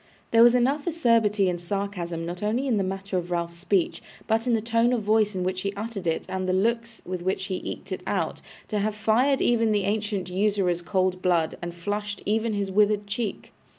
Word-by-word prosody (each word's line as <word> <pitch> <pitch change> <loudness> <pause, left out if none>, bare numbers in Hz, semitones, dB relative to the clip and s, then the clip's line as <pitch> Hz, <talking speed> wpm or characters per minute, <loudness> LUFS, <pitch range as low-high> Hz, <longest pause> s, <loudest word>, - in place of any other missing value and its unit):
There 230 - +6
was 240 +1 +7
enough 275 +6 +1
acerbity 230 - +3
and 175 -1 -1
sarcasm 175 -3 -3
not 175 +1 -5
only 225 +6 0
in 245 -5 +1
the 200 - +1
matter 195 0 -2
of 175 0 -7
Ralph's 170 -1 -2
speech, 185 0 0 0.2
but 225 +2 0
in 245 - +3
the 225 - +3
tone 230 +2 +2
of 235 -3 0
voice 210 -1 +2
in 185 - -1
which 185 0 -1
he 200 - -1
uttered 205 -3 -5
it, 160 - 0
and 185 0 -2
the - - +2
looks 230 +4 0
with 180 -1 -4
which 190 +1 -1
he 190 -2 -3
eked - - -6
it - - -3
out, - - -1 0.3
to 210 - 0
have 210 +1 -1
fired 230 +6 +2
even 230 -2 +3
the 205 -2 +2
ancient 205 -1 -1
usurer's 185 -2 +1
cold 185 0 0
blood 170 -3 +2
and 175 0 -5
flushed 205 +3 -4
even 220 +1 +1
his 200 -1 -2
withered 210 +1 +3
cheek. 205 +1 -4
205 Hz, 215 wpm, -26 LUFS, 185-225 Hz, 0.3 s, was